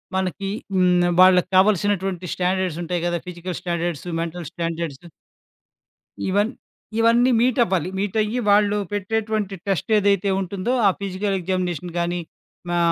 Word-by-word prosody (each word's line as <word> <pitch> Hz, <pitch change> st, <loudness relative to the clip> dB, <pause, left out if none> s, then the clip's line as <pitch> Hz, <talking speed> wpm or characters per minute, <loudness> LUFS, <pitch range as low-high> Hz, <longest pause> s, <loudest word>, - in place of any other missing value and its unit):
మనకి 190 Hz, +1 st, -2 dB, 0.3 s
హ్మ్, 180 Hz, -1 st, +3 dB
వాళ్ళక్కావాల్సినటువంటి 185 Hz, 0 st, +3 dB
స్టాండర్డ్స్ 180 Hz, -2 st, -1 dB
ఉంటాయి 175 Hz, 0 st, -2 dB
కదా! 175 Hz, 0 st, -1 dB
Physical 180 Hz, 0 st, -5 dB
standards, 170 Hz, -3 st, -3 dB, 0.2 s
mental 170 Hz, 0 st, -5 dB
standards. 165 Hz, -3 st, -4 dB, 1.3 s
ఇవన్ 205 Hz, +3 st, +2 dB, 0.5 s
ఇవన్నీ 235 Hz, +2 st, +4 dB
మీటవ్వాలి. 225 Hz, -, +2 dB
మీటయ్యి 210 Hz, +3 st, 0 dB
వాళ్ళు 205 Hz, 0 st, +4 dB, 0.2 s
పెట్టేటువంటి 210 Hz, 0 st, -1 dB
టెస్ట్ 195 Hz, +2 st, -1 dB
ఏదైతే 200 Hz, -1 st, +2 dB
ఉంటుందో 195 Hz, +5 st, -2 dB
ఆ -, -, +7 dB
ఫిజికల్ 195 Hz, +1 st, -2 dB
ఎగ్జామినేషన్ 180 Hz, -2 st, -2 dB
గాని, 175 Hz, +1 st, -1 dB, 0.5 s
మా 175 Hz, -, 0 dB
185 Hz, 110 wpm, -22 LUFS, 175-205 Hz, 1.3 s, ఆ